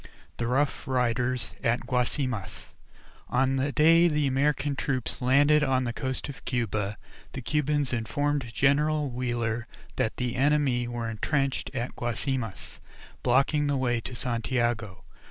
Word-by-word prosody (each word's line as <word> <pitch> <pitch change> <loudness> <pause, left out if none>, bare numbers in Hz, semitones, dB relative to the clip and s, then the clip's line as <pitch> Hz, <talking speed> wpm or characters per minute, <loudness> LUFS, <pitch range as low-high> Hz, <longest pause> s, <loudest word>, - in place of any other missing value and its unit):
I - - -14 0.3
THE 120 - -1
ROUGH 140 +4 0
RIDERS 125 -1 0
AT 120 +1 +1
GUASIMAS 125 - -2 0.6
On 135 +1 +2
the 140 +2 0
day 165 +3 +6
the 150 -3 +1
American 140 +1 +1
troops 135 -1 -2
landed 145 +4 +4
on 130 -2 +2
the 120 -1 -2
coast 130 +1 -3
of 140 - -9
Cuba, 105 -4 -1 0.4
the 130 - -5
Cubans 145 -1 0
informed 140 +2 -1
General 145 +2 +2
Wheeler 120 -2 -2 0.3
that 110 - 0
the 125 -1 -2
enemy 135 -3 +2
were 120 -1 -3
intrenched 135 +5 -1
at 120 0 -3
Guasimas, 120 -2 -3 0.4
blocking 140 +4 +2
the 145 -1 +1
way 120 -3 0
to 125 - -7
Santiago. 120 -3 -1
130 Hz, 135 wpm, -27 LUFS, 120-145 Hz, 0.6 s, day